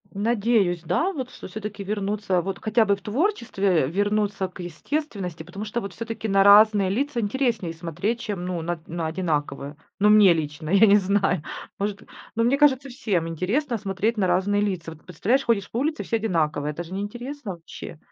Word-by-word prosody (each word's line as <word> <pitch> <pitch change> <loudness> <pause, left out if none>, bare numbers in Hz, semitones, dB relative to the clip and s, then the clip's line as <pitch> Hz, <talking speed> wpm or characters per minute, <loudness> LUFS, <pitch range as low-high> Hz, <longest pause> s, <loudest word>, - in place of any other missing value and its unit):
Надеюсь, 205 -4 +1
да, 335 - 0
вот 260 -6 -4
что - - -10
всё-таки 210 +1 -6
вернуться, 200 -2 -1
вот 195 +2 -4
хотя 220 +1 +3
бы 200 -2 +2
в - - -19
творчестве, 210 - +1
вернуться 205 +2 0
к 180 - -15
естественности. 180 - -4
Потому 180 +5 -7
что, 215 +2 -3
вот 200 -4 -6
всё-таки, 225 -1 -5
на 195 -1 +4
разные 205 -1 +7
лица 255 +4 -1
интереснее 220 -5 -1
смотреть, 170 +8 -3
чем, 205 -7 -4
ну, 180 -2 -3
на 175 +1 -2
на 165 -1 -3
одинаковые. 150 -4 -2 0.2
Ну, 210 +1 +5
мне 210 -4 +7
лично, 155 -1 -4
я 200 +4 +6
не 205 -1 +6
знаю. 195 -4 +1 0.4
Может, 200 0 -2 0.3
ну, 230 - +2
мне 250 +4 +3
кажется, 275 -2 +3
всем 205 -10 -1
интересно 230 - -1
смотреть 210 +3 -1
на 195 -3 +2
разные 190 +3 +2
лица. 185 -5 -2
Вот 155 -1 -14
представляешь, 230 - 0
ходишь 210 -5 +1
по - - -3
улице, 300 +5 -1
все - - -1
одинаковые. 155 -8 0
Это 170 - -5
же 175 +2 -10
не 195 - -2
интересно 240 +3 -6
вообще. 165 -1 -10
200 Hz, 185 wpm, -24 LUFS, 175-225 Hz, 0.4 s, разные